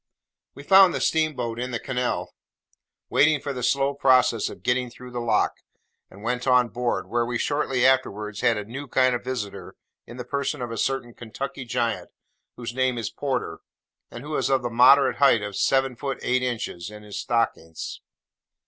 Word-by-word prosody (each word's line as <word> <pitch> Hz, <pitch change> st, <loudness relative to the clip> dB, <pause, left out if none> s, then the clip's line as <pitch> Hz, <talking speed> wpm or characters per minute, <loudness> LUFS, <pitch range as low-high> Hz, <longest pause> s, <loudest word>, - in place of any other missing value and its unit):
We 140 Hz, -, -10 dB
found 190 Hz, +2 st, +6 dB
the -, -, -1 dB
steamboat 130 Hz, -8 st, 0 dB
in 125 Hz, +1 st, -3 dB
the 120 Hz, -, -2 dB
canal, 125 Hz, +1 st, -2 dB, 0.8 s
waiting 155 Hz, 0 st, +4 dB
for 140 Hz, 0 st, -4 dB
the 125 Hz, -, -5 dB
slow 135 Hz, +3 st, +1 dB
process 130 Hz, -5 st, +3 dB
of -, -, -12 dB
getting 125 Hz, 0 st, 0 dB
through 125 Hz, +1 st, -12 dB
the 120 Hz, -, -4 dB
lock, 115 Hz, -3 st, +1 dB, 0.5 s
and 100 Hz, +2 st, -14 dB
went 125 Hz, +2 st, -2 dB
on 125 Hz, -2 st, +4 dB
board, 120 Hz, 0 st, -2 dB
where 120 Hz, 0 st, 0 dB
we 120 Hz, 0 st, -2 dB
shortly 135 Hz, -2 st, 0 dB
afterwards 105 Hz, -6 st, +1 dB
had 120 Hz, -3 st, +3 dB
a 105 Hz, -, -4 dB
new 135 Hz, +6 st, -7 dB
kind 130 Hz, 0 st, +3 dB
of 120 Hz, -, -3 dB
visitor 125 Hz, -6 st, -5 dB, 0.3 s
in 120 Hz, -, -10 dB
the 125 Hz, -, -6 dB
person 140 Hz, +1 st, -2 dB
of 120 Hz, -2 st, -4 dB
a 115 Hz, -, -5 dB
certain 135 Hz, -3 st, -1 dB
Kentucky 130 Hz, +4 st, -6 dB
Giant 120 Hz, -2 st, -2 dB, 0.5 s
whose 120 Hz, -1 st, -6 dB
name 130 Hz, -1 st, 0 dB
is 115 Hz, -, -3 dB
Porter, 135 Hz, -3 st, -3 dB, 0.5 s
and 120 Hz, -, -9 dB
who 150 Hz, +1 st, -5 dB
is -, -, 0 dB
of 135 Hz, -2 st, +2 dB
the 120 Hz, -, -3 dB
moderate 130 Hz, +3 st, +6 dB
height 135 Hz, -6 st, +4 dB
of 105 Hz, -1 st, -5 dB
seven 135 Hz, +2 st, +1 dB
feet 135 Hz, +2 st, -4 dB
eight 125 Hz, 0 st, +1 dB
inches, 115 Hz, -8 st, -3 dB
in 105 Hz, 0 st, -11 dB
his 105 Hz, -1 st, -7 dB
stockings. 115 Hz, -9 st, -2 dB
125 Hz, 185 wpm, -24 LUFS, 115-135 Hz, 0.8 s, found